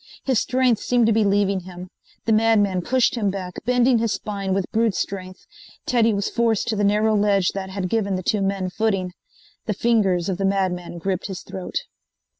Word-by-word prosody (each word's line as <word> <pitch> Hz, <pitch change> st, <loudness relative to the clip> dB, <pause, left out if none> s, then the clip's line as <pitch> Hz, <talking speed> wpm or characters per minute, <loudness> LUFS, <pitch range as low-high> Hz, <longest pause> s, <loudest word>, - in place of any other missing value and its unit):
His 260 Hz, -4 st, +2 dB
strength 250 Hz, -3 st, +1 dB
seemed 245 Hz, -2 st, +2 dB
to 225 Hz, -, +3 dB
be 220 Hz, 0 st, +3 dB
leaving 200 Hz, -1 st, +2 dB
him. 180 Hz, 0 st, -10 dB, 0.4 s
The 225 Hz, -, +2 dB
madman 215 Hz, -4 st, +3 dB
pushed 250 Hz, +5 st, +2 dB
him 215 Hz, -5 st, 0 dB
back, 185 Hz, -2 st, -6 dB
bending 245 Hz, 0 st, +3 dB
his 225 Hz, -1 st, 0 dB
spine 200 Hz, -3 st, -4 dB
with 190 Hz, -1 st, 0 dB
brute 225 Hz, -3 st, +1 dB
strength. 185 Hz, -1 st, -5 dB, 0.4 s
Teddy 230 Hz, -2 st, +3 dB
was 200 Hz, -1 st, -1 dB
forced 230 Hz, -2 st, 0 dB
to 220 Hz, -, 0 dB
the 205 Hz, -, 0 dB
narrow 210 Hz, +2 st, +3 dB
ledge 200 Hz, -3 st, +2 dB
that 190 Hz, -1 st, -5 dB
had 190 Hz, -1 st, -3 dB
given 200 Hz, -1 st, 0 dB
the 185 Hz, -, -4 dB
two 210 Hz, +3 st, 0 dB
men 195 Hz, -1 st, -1 dB
footing. 195 Hz, -3 st, -1 dB, 0.6 s
The 210 Hz, -, -1 dB
fingers 195 Hz, -6 st, +1 dB
of 190 Hz, -1 st, -2 dB
the -, -, -1 dB
madman 185 Hz, -3 st, -1 dB
gripped 185 Hz, +2 st, -2 dB
his 190 Hz, -2 st, -6 dB
throat. 185 Hz, -1 st, -8 dB
200 Hz, 195 wpm, -22 LUFS, 190-225 Hz, 0.6 s, to